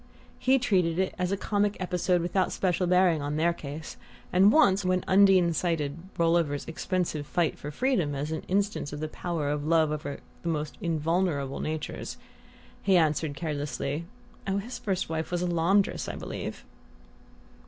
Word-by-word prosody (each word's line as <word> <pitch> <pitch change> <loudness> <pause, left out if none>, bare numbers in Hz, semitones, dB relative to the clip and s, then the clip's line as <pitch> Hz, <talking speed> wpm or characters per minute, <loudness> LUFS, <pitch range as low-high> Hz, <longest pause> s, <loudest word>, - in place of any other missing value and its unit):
He 260 +1 +4
treated 185 -9 +1
it 190 0 0
as 180 0 0
a 200 - +1
comic 205 0 0
episode 180 -1 +1
without 185 +1 +1
special 180 -1 0
bearing 180 -3 +4
on 145 +1 -2
their 170 +2 +2
case, 150 0 -8 0.4
and 190 +3 +6
once, 200 -10 +4
when 185 0 +1
Undine 190 -3 +5
cited 155 -4 -1 0.2
Rolliver's 165 -4 +1
expensive 165 -2 -2
fight 170 -1 0
for 145 - -6
freedom 175 - 0
as 145 +3 -3
an 160 - -2
instance 200 -5 0
of 145 - -6
the 155 - -2
power 160 -2 -3
of 145 0 -2
love 160 0 +3
over 150 -2 -4 0.2
the 170 - -3
most 150 -2 -2
invulnerable 160 -3 0
natures, 155 -1 -4 0.6
had 195 -1 +3
answered 155 -3 +2
carelessly: 150 0 -3 0.4
"Oh, 195 0 +1
his 230 +6 -5
first 190 -3 -1
wife 160 0 -3
was 175 0 -1
a - - +1
laundress, 175 +3 +1
I - - -4
believe." - - -6
170 Hz, 165 wpm, -28 LUFS, 155-185 Hz, 0.6 s, and